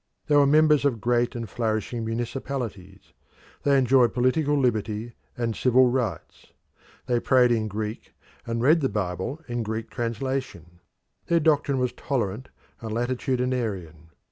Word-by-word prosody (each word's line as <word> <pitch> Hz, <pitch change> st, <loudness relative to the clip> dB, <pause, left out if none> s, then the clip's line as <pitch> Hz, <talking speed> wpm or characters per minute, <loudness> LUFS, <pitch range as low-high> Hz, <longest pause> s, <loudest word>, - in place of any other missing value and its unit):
They 150 Hz, -, +2 dB
were 145 Hz, -1 st, +6 dB
members 150 Hz, 0 st, +4 dB
of 135 Hz, -5 st, +1 dB
great 120 Hz, +3 st, +1 dB
and 115 Hz, -1 st, -4 dB
flourishing 115 Hz, +1 st, -2 dB
municipalities; 115 Hz, -2 st, -5 dB, 0.5 s
they 140 Hz, -1 st, +3 dB
enjoyed 130 Hz, -1 st, +4 dB
political 145 Hz, +4 st, +2 dB
liberty 115 Hz, -3 st, -1 dB, 0.2 s
and 115 Hz, -2 st, -1 dB
civil 125 Hz, 0 st, +4 dB
rights. 120 Hz, -10 st, -3 dB, 0.6 s
They 120 Hz, -1 st, +1 dB
prayed 125 Hz, 0 st, +4 dB
in 110 Hz, -2 st, +1 dB
Greek 105 Hz, +1 st, -6 dB, 0.3 s
and 115 Hz, 0 st, -2 dB
read 155 Hz, +5 st, +5 dB
the 135 Hz, -, +1 dB
Bible 100 Hz, -, -3 dB
in 120 Hz, -1 st, -3 dB
a -, -, 0 dB
Greek 110 Hz, +1 st, -4 dB
translation. 115 Hz, -, -4 dB, 0.5 s
Their 170 Hz, -1 st, +3 dB
doctrine 150 Hz, -3 st, +2 dB
was 125 Hz, -1 st, 0 dB
tolerant 125 Hz, -, -3 dB, 0.3 s
and 110 Hz, -1 st, -6 dB
latitudinarian. 120 Hz, -, -2 dB
120 Hz, 140 wpm, -25 LUFS, 110-130 Hz, 0.6 s, were